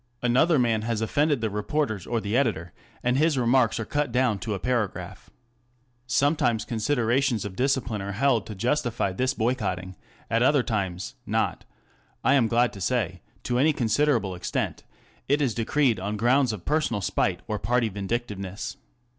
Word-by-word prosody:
Another 140 Hz, +7 st, +4 dB
man 115 Hz, -4 st, +2 dB
has 115 Hz, 0 st, -1 dB
offended 145 Hz, +4 st, +1 dB
the 110 Hz, -, 0 dB
reporters 105 Hz, -, -2 dB
or 120 Hz, -, 0 dB
the 105 Hz, +1 st, -2 dB
editor, 95 Hz, -11 st, 0 dB, 0.3 s
and 125 Hz, +2 st, +2 dB
his 155 Hz, -2 st, +3 dB
remarks 125 Hz, 0 st, +3 dB
are 115 Hz, -, -3 dB
cut 145 Hz, 0 st, -1 dB
down 125 Hz, -4 st, +1 dB
to 110 Hz, 0 st, -3 dB
a -, -, -5 dB
paragraph. 100 Hz, -7 st, -3 dB, 0.8 s
Sometimes 140 Hz, -4 st, +2 dB
considerations 120 Hz, 0 st, 0 dB
of 100 Hz, -2 st, -6 dB
discipline 125 Hz, -3 st, 0 dB
are 100 Hz, +1 st, -4 dB
held 120 Hz, -1 st, +1 dB
to 110 Hz, -, -7 dB
justify 120 Hz, -2 st, 0 dB
this 130 Hz, +8 st, -1 dB
boycotting; 95 Hz, -7 st, -2 dB, 0.3 s
at 115 Hz, +1 st, +1 dB
other 135 Hz, +1 st, +4 dB
times 95 Hz, -6 st, -3 dB
ŌĆö -, -, -7 dB
not, -, -, 0 dB, 0.6 s
I 135 Hz, -, +4 dB
am 130 Hz, -5 st, +4 dB
glad 120 Hz, +1 st, +2 dB
to 100 Hz, -, -9 dB
say, 95 Hz, -4 st, -1 dB, 0.2 s
to 125 Hz, 0 st, 0 dB
any 155 Hz, +3 st, +4 dB
considerable 115 Hz, -4 st, +1 dB
extent 90 Hz, 0 st, -3 dB
ŌĆö -, -, -32 dB
it 145 Hz, +2 st, +2 dB
is 135 Hz, -6 st, +1 dB
decreed 120 Hz, +1 st, +1 dB
on 100 Hz, +3 st, -3 dB
grounds 125 Hz, +3 st, +3 dB
of 105 Hz, -5 st, -7 dB
personal 150 Hz, -9 st, 0 dB
spite -, -, 0 dB
or 105 Hz, -1 st, -2 dB
party 120 Hz, -1 st, +1 dB
vindictiveness. 100 Hz, -1 st, -4 dB
120 Hz, 170 wpm, -26 LUFS, 105-130 Hz, 0.8 s, Another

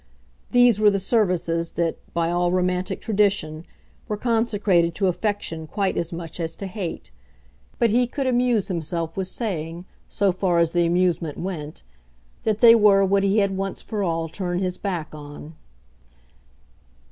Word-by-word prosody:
These 245 Hz, -3 st, +5 dB
were 210 Hz, -1 st, +6 dB
the 200 Hz, -, +1 dB
services 180 Hz, -5 st, 0 dB
that, 170 Hz, -1 st, -1 dB, 0.2 s
by 170 Hz, 0 st, +1 dB
all 175 Hz, 0 st, +1 dB
romantic 180 Hz, 0 st, -1 dB
tradition, 195 Hz, -7 st, 0 dB, 0.4 s
were 210 Hz, -, -2 dB
consecrated 210 Hz, -7 st, +1 dB
to 200 Hz, -, 0 dB
affection 185 Hz, -4 st, -2 dB
quite 195 Hz, +3 st, -1 dB
as 170 Hz, +1 st, -2 dB
much 165 Hz, 0 st, -7 dB
as 165 Hz, -1 st, -3 dB
to 200 Hz, -, -7 dB
hate. 190 Hz, -3 st, -6 dB, 0.7 s
But 235 Hz, -3 st, +2 dB
he 245 Hz, +2 st, +3 dB
could 270 Hz, +3 st, -3 dB
amuse 245 Hz, -4 st, +2 dB
himself 165 Hz, -2 st, -3 dB
with 190 Hz, -1 st, -2 dB
saying 175 Hz, -6 st, -4 dB, 0.2 s
so 200 Hz, -1 st, +1 dB
far 180 Hz, -1 st, 0 dB
as 170 Hz, -1 st, +3 dB
the 175 Hz, 0 st, +2 dB
amusement 175 Hz, -3 st, 0 dB
went 160 Hz, -5 st, -6 dB, 0.6 s
that 215 Hz, -1 st, 0 dB
they 230 Hz, -1 st, +9 dB
were 205 Hz, -3 st, +5 dB
what 195 Hz, +1 st, +2 dB
he 200 Hz, +2 st, +2 dB
had 200 Hz, -2 st, +2 dB
once 195 Hz, 0 st, -4 dB
for 215 Hz, -2 st, -4 dB
all 165 Hz, -3 st, -1 dB
turned 175 Hz, +1 st, -3 dB
his 180 Hz, -1 st, -2 dB
back 175 Hz, -7 st, -4 dB
on. 150 Hz, +1 st, -10 dB
185 Hz, 160 wpm, -23 LUFS, 170-205 Hz, 0.7 s, they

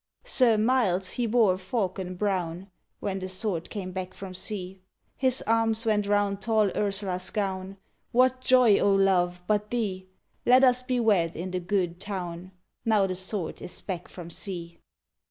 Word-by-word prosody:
_ -, -, -17 dB
Sir 250 Hz, -, +4 dB
Miles 210 Hz, -6 st, +2 dB
he 240 Hz, -2 st, -1 dB
bore 220 Hz, -4 st, +4 dB
a -, -, -4 dB
falcon 185 Hz, -2 st, -3 dB
brown, 185 Hz, -1 st, -2 dB, 0.3 s
When 195 Hz, -1 st, -2 dB
the 185 Hz, -, -5 dB
Sword 185 Hz, -3 st, -1 dB
came 190 Hz, -4 st, -5 dB
back 185 Hz, 0 st, -5 dB
from 195 Hz, -1 st, -8 dB
sea; 185 Hz, 0 st, -5 dB, 0.3 s
His 260 Hz, -1 st, +3 dB
arms 225 Hz, 0 st, +2 dB
went 210 Hz, -2 st, +1 dB
round 205 Hz, -1 st, +1 dB
tall 215 Hz, -1 st, +2 dB
Ursula's 195 Hz, -3 st, -1 dB
gown: 195 Hz, -1 st, -3 dB, 0.3 s
What 255 Hz, +1 st, +3 dB
joy, 250 Hz, -5 st, +5 dB
O 200 Hz, -, +3 dB
love, 180 Hz, -2 st, +2 dB
but 210 Hz, +1 st, 0 dB
thee? 195 Hz, -6 st, -2 dB, 0.4 s
Let 255 Hz, +2 st, +6 dB
us 250 Hz, -1 st, +5 dB
be 255 Hz, -1 st, -1 dB
wed 190 Hz, -8 st, +2 dB
in 180 Hz, +3 st, -5 dB
the 185 Hz, -, -1 dB
good 175 Hz, -1 st, -1 dB
town, 185 Hz, -3 st, -5 dB, 0.3 s
_Now 215 Hz, -4 st, +3 dB
the 185 Hz, -, -2 dB
Sword 185 Hz, -1 st, -4 dB
is 180 Hz, -, -5 dB
back 180 Hz, -3 st, -5 dB
from 170 Hz, -2 st, -10 dB
sea! 170 Hz, -3 st, -5 dB
195 Hz, 170 wpm, -27 LUFS, 185-220 Hz, 0.4 s, Let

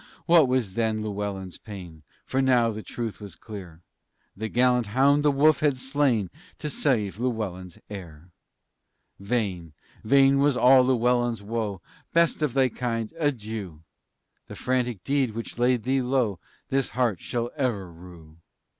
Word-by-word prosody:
What 165 Hz, -4 st, +6 dB
was 125 Hz, -7 st, 0 dB
then 110 Hz, -1 st, 0 dB
Llewellyn's 100 Hz, -3 st, -4 dB
pain! 90 Hz, -7 st, -10 dB, 0.2 s
For 130 Hz, -, 0 dB
now 125 Hz, -3 st, +3 dB
the 110 Hz, 0 st, -6 dB
truth 115 Hz, -1 st, -6 dB
was 100 Hz, -4 st, -9 dB
clear: 90 Hz, -5 st, -10 dB, 0.5 s
The 110 Hz, +2 st, -4 dB
gallant 125 Hz, -1 st, +2 dB
hound 135 Hz, +7 st, +3 dB
the 150 Hz, -, +3 dB
wolf 145 Hz, +2 st, +4 dB
had 145 Hz, -3 st, +2 dB
slain 130 Hz, -7 st, 0 dB, 0.3 s
To 150 Hz, -, -4 dB
save 110 Hz, -, 0 dB
Llewellyn's 100 Hz, -8 st, -3 dB
heir. 90 Hz, -4 st, -10 dB, 0.9 s
Vain, 100 Hz, -7 st, -2 dB, 0.3 s
vain 135 Hz, +3 st, +5 dB
was 140 Hz, -2 st, +3 dB
all 130 Hz, +1 st, +7 dB
Llewellyn's 120 Hz, -3 st, +1 dB
woe; 105 Hz, -4 st, -3 dB, 0.3 s
"Best 170 Hz, -1 st, +3 dB
of 145 Hz, -4 st, 0 dB
thy 135 Hz, -1 st, +4 dB
kind, 115 Hz, -2 st, -3 dB
adieu! 110 Hz, -, -3 dB, 0.6 s
The -, -, -9 dB
frantic 125 Hz, -6 st, -1 dB
deed 135 Hz, -5 st, 0 dB
which 115 Hz, +1 st, -6 dB
laid 125 Hz, -1 st, +2 dB
thee 130 Hz, +1 st, +1 dB
low 125 Hz, -7 st, 0 dB, 0.3 s
This 135 Hz, -1 st, 0 dB
heart 115 Hz, -8 st, +1 dB
shall 120 Hz, +4 st, -3 dB
ever 110 Hz, -, -2 dB
rue!" 85 Hz, -2 st, -14 dB
115 Hz, 145 wpm, -26 LUFS, 100-130 Hz, 0.9 s, all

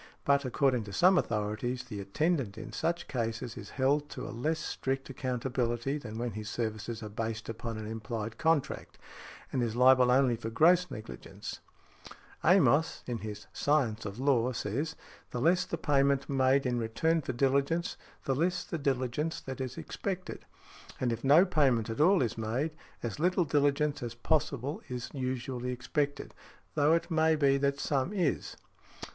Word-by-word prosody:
But, 140 Hz, 0 st, +3 dB
according 130 Hz, -1 st, +2 dB
to 100 Hz, -, -8 dB
some 185 Hz, -, +5 dB
authorities, 110 Hz, +4 st, -2 dB
the 110 Hz, -5 st, -7 dB
attendant 120 Hz, -, -1 dB
in 110 Hz, -, -7 dB
such 170 Hz, +1 st, -1 dB
cases 115 Hz, -1 st, -3 dB
is 110 Hz, -5 st, -8 dB
held 145 Hz, +2 st, +2 dB
to -, -, -6 dB
a -, -, -6 dB
less 155 Hz, +8 st, -1 dB
strict 135 Hz, -3 st, -3 dB
accountability 125 Hz, +1 st, -1 dB
than 110 Hz, -5 st, -7 dB
when 120 Hz, 0 st, -2 dB
his 105 Hz, 0 st, -6 dB
services 110 Hz, 0 st, -3 dB
are -, -, -4 dB
based 110 Hz, +1 st, -4 dB
upon 115 Hz, 0 st, -5 dB
an 110 Hz, -, -5 dB
implied 110 Hz, 0 st, -5 dB
contract, 160 Hz, -4 st, 0 dB, 0.6 s
and 130 Hz, -, +1 dB
is 115 Hz, -2 st, -1 dB
liable 125 Hz, 0 st, +6 dB
only 125 Hz, -1 st, +4 dB
for 115 Hz, 0 st, -5 dB
gross 175 Hz, +9 st, +4 dB
negligence. 105 Hz, -, -8 dB, 0.8 s
Amos, 160 Hz, -3 st, +4 dB
in 120 Hz, -2 st, -3 dB
his 105 Hz, -1 st, -7 dB
"Science 125 Hz, -7 st, +1 dB
of 100 Hz, 0 st, -6 dB
Law," 130 Hz, -2 st, +2 dB
says, 140 Hz, +10 st, -2 dB, 0.3 s
"The 125 Hz, -, -4 dB
less 170 Hz, +7 st, +3 dB
the 170 Hz, -, -3 dB
payment 140 Hz, -2 st, +2 dB
made 135 Hz, 0 st, +3 dB
in 125 Hz, -1 st, 0 dB
return 160 Hz, +9 st, +1 dB
for 135 Hz, -, -3 dB
diligence, 140 Hz, +6 st, +1 dB, 0.3 s
the 135 Hz, -, +1 dB
less 175 Hz, +7 st, 0 dB
the 170 Hz, -, -4 dB
diligence 140 Hz, +3 st, -1 dB
that 130 Hz, 0 st, -6 dB
is 130 Hz, -1 st, -4 dB
expected; 190 Hz, -2 st, -5 dB, 0.5 s
and 120 Hz, -2 st, +1 dB
if 115 Hz, -, -6 dB
no 150 Hz, +7 st, +7 dB
payment 135 Hz, -, +2 dB
at 115 Hz, -, -2 dB
all 180 Hz, 0 st, +5 dB
is 115 Hz, -1 st, -3 dB
made, 120 Hz, +8 st, -1 dB, 0.3 s
as 120 Hz, +3 st, -4 dB
little 180 Hz, +1 st, +2 dB
diligence 145 Hz, 0 st, +1 dB
as 120 Hz, -1 st, -5 dB
possible 145 Hz, -, -1 dB
is 125 Hz, -2 st, -4 dB
|66| 140 Hz, -, -8 dB
usually 125 Hz, 0 st, -3 dB
expected, 145 Hz, +3 st, -2 dB, 0.4 s
though 150 Hz, +1 st, +4 dB
it 170 Hz, +1 st, -2 dB
may 160 Hz, 0 st, +4 dB
be 140 Hz, -2 st, +3 dB
that 140 Hz, 0 st, +1 dB
some 140 Hz, +4 st, 0 dB
is." 180 Hz, -9 st, -1 dB
130 Hz, 165 wpm, -31 LUFS, 115-150 Hz, 0.8 s, no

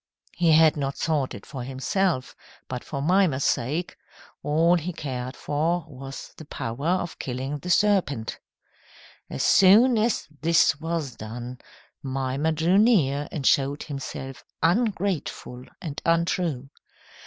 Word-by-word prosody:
"He 170 Hz, -2 st, +3 dB
had 160 Hz, -1 st, +5 dB
not 140 Hz, -1 st, -2 dB
sought 150 Hz, -5 st, -1 dB
it 100 Hz, -, -11 dB
for 135 Hz, -3 st, -7 dB
himself, 135 Hz, +4 st, -1 dB, 0.3 s
but 125 Hz, -1 st, -5 dB
for 140 Hz, -2 st, -5 dB
Mimer's 170 Hz, -5 st, +2 dB
sake. 150 Hz, +9 st, -1 dB, 0.4 s
All 160 Hz, +4 st, +3 dB
he 175 Hz, 0 st, 0 dB
cared 130 Hz, -4 st, -5 dB
for 160 Hz, +3 st, -1 dB
was 135 Hz, -2 st, -9 dB
the 155 Hz, -, -10 dB
power 130 Hz, +2 st, -4 dB
of 175 Hz, -1 st, -1 dB
killing 135 Hz, +3 st, -4 dB
the 180 Hz, -, -7 dB
serpent." 175 Hz, -, +1 dB, 0.9 s
As -, -, -3 dB
soon 220 Hz, +5 st, +6 dB
as 230 Hz, +2 st, 0 dB
this 160 Hz, -3 st, +3 dB
was 160 Hz, -6 st, -3 dB
done, 120 Hz, +3 st, -7 dB, 0.4 s
Mimer 135 Hz, +3 st, -1 dB
drew 165 Hz, +5 st, +3 dB
near 150 Hz, -, +3 dB
and 140 Hz, -4 st, -4 dB
showed 140 Hz, +2 st, +2 dB
himself 135 Hz, -2 st, -7 dB, 0.2 s
ungrateful 180 Hz, -, -1 dB
and 150 Hz, -5 st, -6 dB
untrue. 165 Hz, -5 st, 0 dB
150 Hz, 130 wpm, -25 LUFS, 135-175 Hz, 0.9 s, soon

